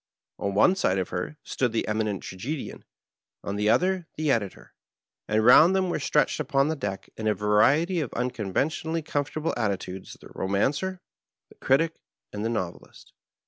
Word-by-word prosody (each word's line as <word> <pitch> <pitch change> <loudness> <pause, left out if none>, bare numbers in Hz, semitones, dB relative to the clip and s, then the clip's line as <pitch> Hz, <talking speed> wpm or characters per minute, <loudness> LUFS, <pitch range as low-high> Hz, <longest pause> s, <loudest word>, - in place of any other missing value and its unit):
On 100 0 -2
one 180 - +5
side 95 - +1
of 95 - -2
her 90 +12 -4
stood 125 -3 -1
the 115 - -1
Eminent 105 -2 -1
Tragedian, 130 +11 -6 0.6
on 100 - -3
Uie 105 +1 +3
other 185 +1 +1
the 155 -2 0
Editor, 105 -7 -3 0.5
and 110 +1 +1
round 160 +9 +8
them 185 -2 +1
were - - -1
stretched 150 +2 +1
npon 140 0 +1
the 160 - 0
deck 100 -9 -5
in 110 - -3
a 105 - +2
variety 135 - +3
of 145 -6 -2
nnconven= 115 -5 -3 0.2
tionally 160 0 -4
comfortable 150 +3 -2
attitudes 95 -4 -3
the - - -14
Romancer, 140 - -1 0.5
the - - -18
Critic, 165 +5 +2 0.4
and 105 - -4
the 115 - 0
Novelist. 95 -7 -6
125 Hz, 165 wpm, -26 LUFS, 105-155 Hz, 0.6 s, round